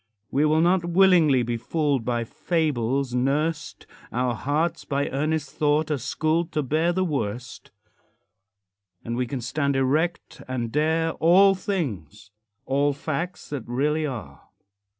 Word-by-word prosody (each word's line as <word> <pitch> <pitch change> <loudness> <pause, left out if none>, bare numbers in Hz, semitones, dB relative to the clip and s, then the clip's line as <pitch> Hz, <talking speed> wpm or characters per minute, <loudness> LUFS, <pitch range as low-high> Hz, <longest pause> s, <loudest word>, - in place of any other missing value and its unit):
We 145 +3 +2
will 155 +1 +3
not 175 +1 +3
willingly 170 -7 +4
be 120 0 -2
fooled, 145 0 -1
By 120 -1 0
fables 135 -3 -1
nursed; 150 +5 -1 0.3
Our 125 0 0
hearts, 150 +8 -1
by 140 0 -1
earnest 150 0 -1
thought, 150 +1 +1
are 145 - 0
schooled 160 +6 -1
To 150 -1 0
bear 155 +6 +1
the 185 +2 0
worst; 125 - -4 1.4
And 115 - -3
we 125 0 -1
can 130 0 -4
stand 140 +3 -1
erect 150 +6 -1
and 120 -3 -3
dare 160 +3 +1
All 190 +5 +5
things, 105 - -4 0.3
all 140 +2 +1
facts 155 +5 -4
that 145 -3 -3
really 150 +5 0
are. 100 - -7
145 Hz, 135 wpm, -24 LUFS, 125-160 Hz, 1.4 s, All